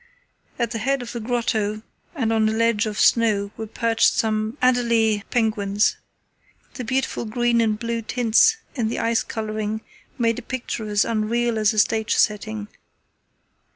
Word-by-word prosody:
At 235 -2 -1
the 230 - -3
head 270 +3 0
of 235 - -8
the 240 - -5
grotto 220 -2 -1 0.3
and 225 -6 0
on 220 -1 +3
a - - 0
ledge 225 -1 +1
of 210 -1 -4
snow 210 -4 +3
were 220 -1 -6
perched 230 +1 +2
some 215 +2 -1
adelie 235 -4 +2
penguins. 210 -3 +1 0.8
The 255 - -6
beautiful 260 +2 -1
green 235 +1 +1
and 215 -2 +1
blue 230 +1 -3
tints 245 - +3 0.2
in 235 -5 -1
the 225 - -3
ice 230 0 +1
colouring 215 0 -4 0.4
made 230 -1 +1
a - - -8
picture 235 -3 -5
as 205 0 +2
unreal 230 +1 0
as 215 -1 +3
a 215 - -6
stage 220 0 +2
setting. 210 0 0
225 Hz, 155 wpm, -22 LUFS, 215-235 Hz, 0.8 s, on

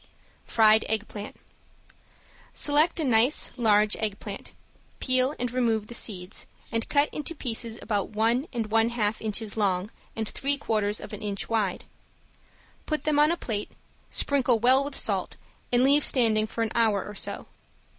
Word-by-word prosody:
~FRIED 220 -1 +5
EGGPLANT~ 215 -1 -4 1.2
Select 300 +4 +2
a - - 0
nice 250 +2 +3
large 215 -3 +3
eggplant, 210 -2 -5 0.5
peel, 255 +2 +2 0.2
remove 230 -4 +1
the 235 - -10
seeds, 190 -5 -5 0.2
and 230 0 -2
cut 285 0 +3
into 305 +3 -5
pieces 230 -4 -4
about 205 -3 -1
one 230 +6 +1
and 225 -4 -3
one 225 +1 +3
half 220 -3 -1
inches 220 -1 -2
long 195 -1 0 0.2
and 220 -1 -3
three 280 +5 -1
quarters 215 -5 0
of - - -9
an 210 - -7
inch 200 -2 -4
wide. 215 -5 0 1.0
Put 305 -2 -1
them 300 -1 +2
on 300 +1 +5
a 340 - -1
plate, 210 -9 -4 0.4
sprinkle 265 -4 +2
well 255 +4 +4
with 285 0 -6
salt - - 0 0.4
and 245 0 +3
leave 285 +2 +5
standing 220 -4 +3
for 230 +1 -2
an 220 - -2
hour 220 -4 +2
or 210 - -8
so. 195 - -4
225 Hz, 155 wpm, -26 LUFS, 215-260 Hz, 1.2 s, ~FRIED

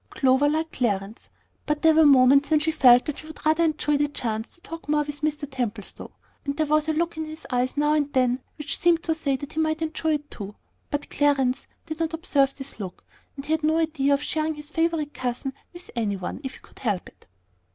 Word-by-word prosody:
Clover 265 +2 +3
liked 315 +2 -1
Clarence; 210 -2 -2 0.4
but 300 +1 -1
there 320 0 +7
were 315 -1 +6
moments 275 +1 +6
when 310 -1 +4
she 315 +1 +1
felt 250 -5 +6
that 300 - -4
she 310 - -10
would 315 -1 -11
rather 315 +2 +4
enjoy 305 -2 +1
the 290 +1 +2
chance 225 -6 -3
to 345 - -18
talk 330 -3 -9
more 300 0 +3
with 295 0 -5
Mr. 300 -1 -1
Templestowe, 235 -6 -4 0.3
and 280 0 -3
there 310 - +2
was 305 +1 +2
a - - +2
look 335 +1 -1
in 315 - -2
his 310 +1 -10
eyes 250 +2 0
now 295 +1 +3
and 290 -2 +1
then 255 -1 +2 0.2
which 300 -1 -2
seemed 340 -1 +3
to 325 - +1
say 285 -4 -1
that 285 +3 -7
he 315 - -3
might 315 0 0
enjoy 320 0 -1
it 295 0 -7
too. 205 -1 -7 0.3
But 290 0 -3
Clarence 275 -3 +1 0.2
did 315 -1 -6
not 325 0 -1
observe 280 -5 +1
this 270 -4 -5
look, 185 -3 -7 0.3
and 275 -1 -7
he 305 - -4
had 315 0 +2
no 315 +1 +3
idea 300 -4 +2
of 280 - -4
sharing 315 0 -1
his 295 +1 -10
favorite 325 -3 0
cousin 255 +2 -3 0.2
with 350 0 -11
any 215 -4 0
one, 185 -2 -5
if 265 - -5
he - - -14
could - - -18
help 210 -8 -1
it. - - -19
295 Hz, 235 wpm, -25 LUFS, 260-315 Hz, 0.4 s, there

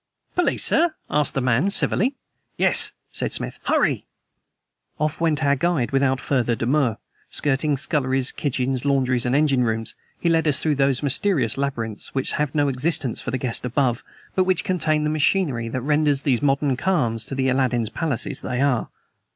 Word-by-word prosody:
"Police, 355 -1 +1
sir?" 330 -1 +3 0.2
asked 150 -1 +1
the 135 - 0
man 125 +9 +2
civilly. 240 +6 +1 0.4
"Yes," - - +4 0.2
said - - 0
Smith; - - -2
"hurry!" - - +1 0.9
Off 155 +1 -1
went 155 -2 +1
our 140 0 +3
guide 160 -4 0
without 135 -1 +2
further 120 -4 0
demur. 125 -1 +1 0.3
Skirting 145 +1 +1
sculleries, 135 -3 0
kitchens, 130 -2 -2
laundries 130 -3 +1
and 125 - +1
engine 140 -4 +3
rooms, 115 -1 0 0.3
he - - -1
led 165 -1 +2
us 145 -2 +2
through 155 - +1
those 135 -1 +1
mysterious 140 - +1
labyrinths 120 -7 -4
which 135 - 0
have 150 -2 -2
no 145 -1 +2
existence 135 -1 0
for - - -5
the 130 - -1
guest 125 -2 -3
above, 125 -1 0 0.3
but 185 - +2
which 185 -1 +1
contain 155 -4 0
the 150 - 0
machinery 150 -6 0
that 130 +2 -3
renders 145 0 +1
these 130 -5 +1
modern 140 -1 +1
khans 125 - 0
the 135 -1 -1
Aladdin's 125 -4 +1
palaces 155 -5 -2
they 125 -1 -3
are. 135 -4 +1
140 Hz, 165 wpm, -22 LUFS, 125-150 Hz, 0.9 s, Yes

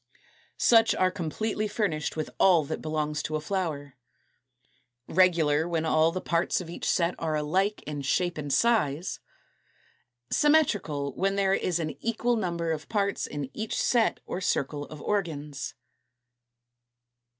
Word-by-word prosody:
Such 230 -1 +5
are 185 0 +2
completely 210 +5 -2
furnished 205 -8 -1
with 155 - -3
all 175 -5 +5
that - - -4
belongs 150 -1 -2
to 155 - -3
a - - 0
flower. 150 -6 -3 1.1
Regular, 165 -3 +3
when 165 -1 0
all 160 +1 +3
the 185 - -3
parts 170 0 0
of 170 -2 -7
each - - -3
set 170 0 +2
are 160 -2 -1
alike 185 +8 0
in 145 -1 -5
shape 175 +5 0
and 145 -1 -4
size. 175 - +1 1.1
Symmetrical, 205 - +2
when 195 +5 0
there 195 -1 +2
is 180 -3 0
an 160 -2 -2
equal 230 +1 +1
number 170 -6 -1
of 155 -1 -4
parts 200 -2 0
in 145 -2 -5
each 220 0 -3
set 235 -3 +2
or 185 - -4
circle 145 -4 -1
of 150 -1 -10
organs. 150 - -3
170 Hz, 140 wpm, -27 LUFS, 150-195 Hz, 1.1 s, Such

